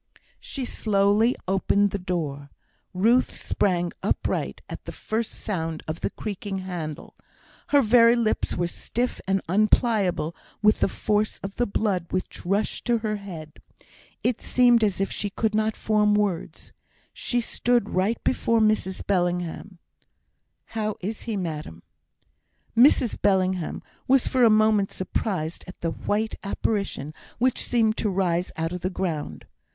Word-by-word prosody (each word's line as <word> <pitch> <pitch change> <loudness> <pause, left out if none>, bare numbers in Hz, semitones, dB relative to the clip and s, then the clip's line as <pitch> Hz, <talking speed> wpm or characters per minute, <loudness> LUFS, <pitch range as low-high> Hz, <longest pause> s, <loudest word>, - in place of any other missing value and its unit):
She 270 -3 -5
slowly 210 +1 +2
opened 195 +1 +2
the 200 - -2
door. 150 -6 -3 0.4
Ruth 225 +7 +2
sprang 175 -3 0
upright - - -1
at - - -8
the - - -5
first 220 +1 -2
sound 165 -6 -4
of 155 +1 -4
the - - 0
creaking 205 -1 -5
handle. 175 -5 -6 0.5
Her 285 -1 +4
very 230 +1 +6
lips 230 -2 0
were 175 - +1
stiff 240 +8 -3
and 195 0 +1
unpliable 200 -3 +2 0.2
with 210 0 +4
the - - +3
force 210 +2 0
of 195 0 -6
the 245 - +1
blood 200 -4 0
which 185 - -4
rushed 200 +3 0
to 240 -1 +3
her 215 -1 0
head. 170 -6 -9 0.6
It 245 -2 0
seemed 245 -2 +4
as 200 -3 +1
if 195 - 0
she 205 - -2
could 215 +2 -1
not 215 0 +1
form 210 -1 +2
words. 205 -5 -2 0.4
She 245 - -1
stood 240 -1 0
right 195 +5 +1
before 230 -3 +2
Mrs 215 -4 +1
Bellingham. 180 0 -1 1.0
"How 215 -1 -1
is 210 +4 -4
he, 215 - -1
madam?" 155 - -5 0.9
Mrs 240 -1 +4
Bellingham 185 -3 +1 0.2
was 265 -1 +4
for 255 -1 +2
a 230 - +7
moment 215 -2 +3
surprised 185 -3 -3
at 185 - -11
the 165 - -1
white 215 +6 -1
apparition 195 -7 -2 0.2
which 255 +1 +1
seemed 225 -3 +2
to 215 - 0
rise 180 -2 0
out 165 +1 -2
of 180 - -5
the 185 - -1
ground. 160 - -4
200 Hz, 145 wpm, -25 LUFS, 180-220 Hz, 1.0 s, a